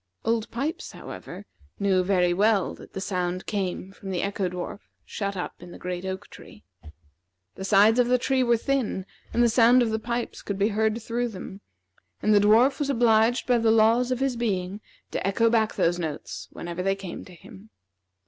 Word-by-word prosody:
Old 230 0 0
Pipes, 280 +8 -4
however, 190 +3 -9 0.3
knew 190 -2 +2
very 180 -2 +2
well 205 0 +2
that - - -14
the - - -4
sound 185 -2 -2
came 190 -2 -3
from 195 0 -10
the 180 -2 -1
Echo 200 -2 -1
dwarf 180 +2 -6 0.3
shut 200 -2 -4
up 180 - -6
in 175 - -10
the - - -10
great 180 0 -5
oak 190 0 -5
tree. - - -14 0.9
The - - -8
sides 210 +4 +5
of 245 - +4
the 250 +1 +4
tree 260 +1 +1
were 235 -2 +3
thin, 240 -7 -1 0.3
and 240 - +2
the - - +5
sound 240 +2 +5
of 225 - -1
the 220 - -1
pipes 235 +1 -4
could 200 - -4
be 200 +2 +2
heard 220 +1 0
through 240 +2 -2
them, 195 -2 -9 0.6
and 215 - +2
the 205 - +6
dwarf 225 +8 +4
was 290 -1 -1
obliged 235 -1 +3
by 245 -2 +3
the 225 0 +2
laws 225 +3 +4
of 255 0 -1
his 270 -2 +1
being 200 -4 -2 0.3
to - - -2
echo 230 +3 +2
back 220 -2 +2
those 175 +1 +1
notes 160 -3 -5
whenever 170 +1 -5
they 195 +1 +1
came 195 -3 -7
to 180 - -13
him. 200 +3 -15
210 Hz, 195 wpm, -26 LUFS, 190-235 Hz, 0.9 s, the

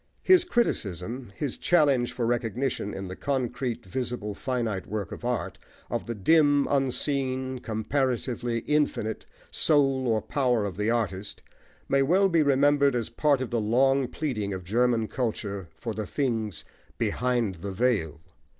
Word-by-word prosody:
His 370 -1 +6
criticism, 115 - -1
his 140 +1 -3
challenge 140 -8 +3
for 120 - -2
recognition 120 -1 -1
in 95 -1 -5
the 90 - -6
concrete, 125 -3 -2
visible, 115 0 -3
finite 115 -4 -2
work 105 -4 -4
of - - -8
art, 120 -2 -2 0.3
of - - -2
the 115 - -3
dim, 145 +5 +4
unseen, 130 -1 0
comparatively 120 0 -1
infinite, 145 -7 -1 0.2
soul 135 -4 +2
or 110 -2 +2
power 125 -6 +1
of 100 - -4
the 105 +2 0
artist, 105 -4 -2 0.4
may 135 0 +3
well 185 +8 +4
be 170 -3 +3
remembered 140 -1 +4
as 115 -3 -1
part 140 +2 +2
of 130 - -4
the 120 -2 +1
long 135 +5 +3
pleading 115 -10 -3
of 95 - -7
German 115 +3 +1
culture 100 -7 -3
for 115 +8 -5
the 110 -1 -4
things 110 - -2 0.3
"behind 120 -5 0
the 100 +1 -4
veil." 95 -8 0
125 Hz, 145 wpm, -27 LUFS, 110-135 Hz, 0.4 s, His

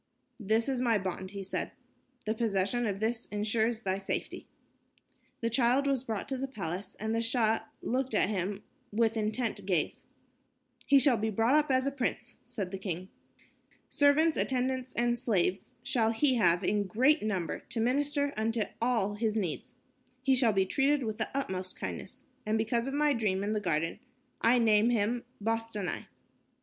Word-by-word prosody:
"This 220 +2 +1
is 260 -2 0
my 235 -3 +3
bond," 190 -1 -4
he 200 0 -6
said. 190 - -3 0.5
"The 215 - +1
possession 225 +1 0
of 195 -1 -2
this 225 +2 -1
ensures 220 +2 0
thy 190 0 -1
safety." 195 - -4 0.9
The 230 - +1
child 250 +3 +3
was 270 -3 +1
brought 220 -5 -3
to 265 -2 -2
the 270 - -2
palace, 195 -6 -5
and 220 +1 -2
the 230 - +1
Shah 225 -2 +1 0.2
looked 255 -1 -1
at 205 - +3
him 200 0 -2 0.3
with 225 +1 +2
intent 215 -1 -1
gaze. 175 -6 -1 0.8
"He 280 - +6
shall 265 -2 +5
be 220 +1 -1
brought 225 +5 +2
up 300 -1 +3
as 260 0 +2
a 275 - +1
prince," 245 -2 -3
said 220 -7 -5
the 195 - -5
king. 185 -1 -4 0.8
"Servants, 300 +3 +4
attendants 260 0 -1
and 240 0 +2
slaves 195 -6 0
shall 225 -3 +2
he 265 +4 +3
have 175 -3 +3
in 205 +1 +1
great 260 - +3
number 190 -7 -2
to 230 - -3
minister 285 +4 +1
unto 220 +1 0 0.2
all 230 -4 +1
his 215 +1 -1
needs. 185 -8 -3 0.5
He 265 0 +4
shall 250 -3 +4
be 195 -2 +2
treated 275 +6 +2
with 220 -1 -4
the 220 - 0
utmost 185 -8 -3
kindness. - - -6 0.2
And 215 +1 0
because 235 +2 0
of 270 - -3
my 295 0 +3
dream 205 -5 0
in 205 - -1
the 215 - 0
garden, 165 -2 -1 0.4
I 235 +2 +5
name 220 -1 +4
him 235 +1 0
Bostanai." 225 -3 -2
225 Hz, 170 wpm, -30 LUFS, 205-250 Hz, 0.9 s, He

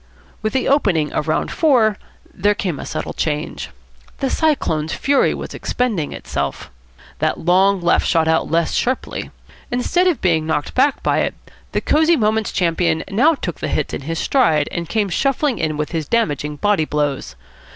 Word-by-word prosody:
With 215 - -2
the 260 - 0
opening 195 - +2
of - - -2
round - - 0
four 250 - +3 0.4
there 205 +2 +1
came 180 -8 -3
a - - -6
subtle - - -4
change. 150 -1 -3 0.5
The 270 -1 -1
Cyclone's 160 - 0
fury 280 0 +2
was - - -7
expending 220 -12 -2
itself. - - -4 0.5
That - - 0
long 190 +3 +3
left 175 - +2
shot 165 -1 +2
out 160 0 +1
less 165 +1 +1
sharply. 255 +1 -2 0.4
Instead 300 +9 +1
of 350 -6 +1
being 160 -4 +1
knocked 150 -2 -1
back 275 +2 +2
by - - +2
it, - - -1 0.4
the - - -1
Cosy 315 +2 +3
Moments 215 - +1
champion 165 -2 +1
now 285 +11 +4
took 175 - -5
the - - -3
hits 150 0 -2
in - - -3
his 165 +4 -4
stride, 160 - +2
and 170 -1 -4
came 215 -2 +1
shuffling 275 - 0
in 155 -2 -1
with 150 0 -3
his 160 -3 -3
damaging 150 - 0
body 200 0 +1
blows. 145 - -2
185 Hz, 170 wpm, -19 LUFS, 160-250 Hz, 0.5 s, now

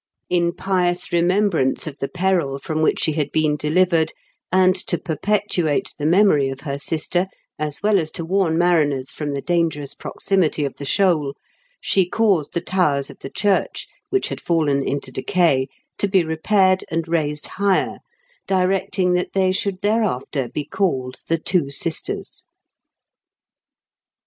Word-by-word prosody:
In 170 -1 +2
pious 180 -1 -1
remembrance 175 -5 +2
of 145 -3 -7
the 135 - -2
peril 175 -6 0
from 155 +3 -3
which 155 - +2
she 155 - +2
had 150 -2 -2
been 155 -1 +2
delivered, 160 +1 +2 0.4
and 185 0 +5
to 175 - +1
perpetuate 175 -2 0
the 145 - 0
memory 165 -6 +4
of 135 0 -7
her 140 -2 -4
sister, 170 +5 0 0.3
as 150 +3 -4
well 210 -1 +4
as 160 -2 -2
to 165 - -3
warn 180 -2 +1
mariners 150 -7 +2
from 150 -1 -5
the 140 - -4
dangerous 165 -5 0
proximity 170 -6 -1
of 140 - -3
the 140 - -6
shoal, 155 -4 +2 0.4
she 190 -2 +2
caused 195 -10 +1
the 170 - 0
towers 150 -7 0
of - - -16
the 135 - -7
church, 200 +4 0 0.2
which 390 - 0
had - - -6
fallen 150 -5 +1
into 135 -1 -3
decay, 135 0 +1 0.3
to 200 - +2
be 190 -2 +3
repaired 185 +4 +2
and 165 0 -2
raised 150 -3 0
higher, 200 -1 0 0.5
directing 185 -1 +1
that 180 0 -1
they 190 -1 +3
should 190 0 -2
thereafter 190 - 0
be 145 +4 -4
called 145 -8 -2
the 165 - +1
Two 165 -3 0
Sisters. 160 +3 -1
170 Hz, 150 wpm, -21 LUFS, 145-185 Hz, 0.5 s, and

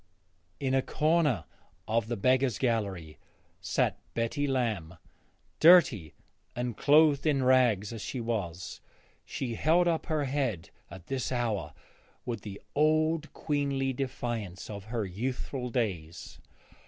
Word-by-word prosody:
In 135 -2 -1
a 135 - +4
corner 155 -2 +1 0.4
of 110 0 0
the 120 0 -2
beggars' 130 +2 +2
gallery 100 - -2 0.4
sat 85 -1 0 0.2
Betty 115 +5 0
Lamb. 110 -11 -1 0.6
Dirty 140 - +6 0.4
and 120 -2 -3
clothed 150 0 +4
in 140 -3 +2
rags 120 -5 +3
as 115 - -6
she 130 - -4
was, 100 -7 -4 0.4
she 125 -3 -4
held 165 +8 +3
up 165 -2 0
her 155 -2 0
head 130 - -2 0.2
at 95 -3 -11
this 135 -2 -3
hour 105 - -2 0.5
with 120 -2 -4
the 100 -2 -8
old 155 +1 +2
queenly 140 -3 -1
defiance 120 -8 -4
of 100 -2 -7
her 110 -1 -2
youthful 125 +6 -4
days. 90 -10 -3
125 Hz, 125 wpm, -29 LUFS, 105-140 Hz, 0.6 s, Dirty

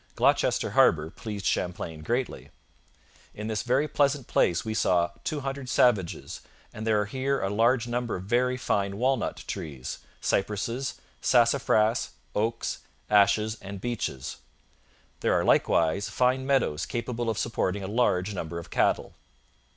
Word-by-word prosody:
Gloucester - - +2
Harbour 80 0 +4
pleased 105 -3 -6
Champlain 85 -3 -2
greatly. 120 +8 -2 0.9
'In 105 - -6
this 110 -1 -1
very 130 +5 +1
pleasant 140 -2 +1
place 85 -5 +2
we 110 - -2
saw 85 -5 +2
two 150 -2 -2
hundred 135 -1 -4
savages, 105 -11 +1 0.3
and 110 +1 -6
there 110 -1 +3
are - - -1
here 135 +5 -1
a 95 - -1
large 115 +3 +3
number 120 -1 -2
of 90 - -5
very 125 +5 +1
fine 100 -5 -1
walnut 130 +1 0
trees, 75 -9 -5 0.2
cypresses, 110 +6 -1 0.3
sassafras, 120 -2 +3 0.2
oaks, 115 +2 -1 0.3
ashes 105 +2 +4
and 100 0 -7
beeches....There 105 - -5
are - - -1
likewise 85 +5 +2
fine 130 +1 +1
meadows 130 - +1
capable 120 0 -3
of 110 - -1
supporting 100 -3 -1
a - - -4
large 105 -3 +1
number 85 -3 -4
of 85 - -8
cattle.' - - +1
110 Hz, 135 wpm, -27 LUFS, 95-125 Hz, 0.9 s, Harbour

